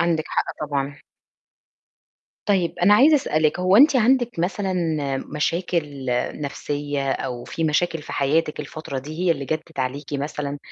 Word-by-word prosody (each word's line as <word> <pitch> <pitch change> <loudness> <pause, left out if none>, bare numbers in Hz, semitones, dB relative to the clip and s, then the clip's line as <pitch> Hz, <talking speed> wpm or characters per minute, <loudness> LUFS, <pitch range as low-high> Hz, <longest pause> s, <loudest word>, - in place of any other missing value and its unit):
عندِك 165 -2 +1
حق - - 0 0.2
طبعًا. 145 -1 -3 1.5
طيب 185 -5 +1
أنا 185 +4 +6
عايزة 290 +8 +6
أسألِك، 155 - +1
هو 185 +2 +4
أنتِ 280 +2 +7
عندِك 245 -3 +2
مثلًا، 190 +2 -1 0.5
مشاكل 150 -2 -2 0.3
نفْسية 145 -1 -2
أو 125 -3 -4
في 165 - -3
مشاكل 160 +1 +1
في - - -8
حياتِك 150 +3 +1
الفترة 150 -2 -6
دي 150 +4 -8
هي - - +4
اللي 150 -4 0
جدِّت 155 +1 -4
عليكِ 135 +3 -3
مثلًا؟ 145 0 -3
155 Hz, 140 wpm, -23 LUFS, 145-175 Hz, 1.5 s, أنتِ